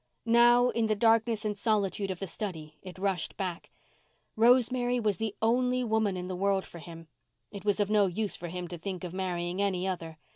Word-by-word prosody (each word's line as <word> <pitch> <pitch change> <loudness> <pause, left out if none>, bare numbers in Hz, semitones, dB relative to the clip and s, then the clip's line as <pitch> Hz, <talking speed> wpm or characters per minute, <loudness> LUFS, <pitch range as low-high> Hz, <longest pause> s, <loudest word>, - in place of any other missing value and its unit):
Now, 240 +1 +5
in 230 -2 0
the 215 - +1
darkness 225 0 +2
and 210 -1 -1
solitude 200 -2 0
of 190 - -3
the 195 - -4
study 160 -6 -6
it 185 -1 -10
rushed 190 -3 -2
back. 180 -3 -4 0.7
Rosemary 245 +1 +3
was 210 -4 0
the 220 -2 -3
only 250 +2 +2
woman 220 -4 0
in 180 0 -5
the 185 - -4
world 195 +1 0
for 170 - -11
him. 165 0 -11 0.4
It 200 -1 -9
was 205 0 +1
of 205 0 0
no 205 -2 +4
use 205 +3 -2
for 175 - -7
him 180 +1 -5
to 175 - -7
think 185 0 -5
of 180 -1 -6
marrying 180 0 -2
any 190 -2 0
other. 165 -4 -5
200 Hz, 205 wpm, -29 LUFS, 180-225 Hz, 0.7 s, Now